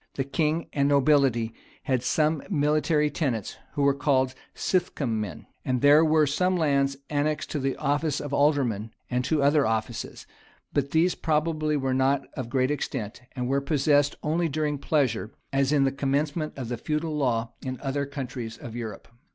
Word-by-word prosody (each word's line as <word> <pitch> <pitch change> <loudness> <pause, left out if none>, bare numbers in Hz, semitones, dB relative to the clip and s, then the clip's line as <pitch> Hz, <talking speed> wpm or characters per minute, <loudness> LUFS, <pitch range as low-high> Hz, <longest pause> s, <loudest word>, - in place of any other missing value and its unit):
The 135 - 0
king 155 +4 0
and 140 0 +2
nobility 135 -5 +3 0.3
had 130 -2 0
some 155 +4 +1
military 150 -2 +2
tenants, 130 - -2 0.2
who 145 - 0
were 140 0 +5
called 135 -2 +1 0.2
"sithcun 170 -7 0
men."[] 95 -8 -5 0.2
And 125 -2 0
there 145 +2 +7
were 155 -1 +4
some 180 +6 +1
lands 140 -4 +1
annexed 150 +1 -1
to 150 - -1
the 135 0 -1
office 145 0 0
of 145 -1 -5
aldermen, 135 -8 +2 0.2
and 125 0 +1
to 150 0 +1
other 145 -1 +4
offices; 110 +1 -3 0.5
but 140 -1 0
these 165 +4 +3
probably 155 -1 0
were 135 -2 0
not 135 +1 +2
of 125 -3 -5
great 130 +1 +1
extent, 125 -6 -4
and 125 -1 -2
were 135 +2 +1
possessed 145 0 +2
only 165 +2 +1
during 150 -1 -1
pleasure, 130 -8 0 0.2
as 135 0 +2
in 145 -2 +4
the 135 - +2
commencement 145 +3 -1
of 125 -4 -5
the 120 - -2
feudal 155 +4 -2
law 120 -5 0
in 130 -1 -5
other 140 0 -2
countries 125 -5 -6
of 115 -1 -9
Europe. 115 -3 -6
140 Hz, 170 wpm, -26 LUFS, 130-150 Hz, 0.5 s, there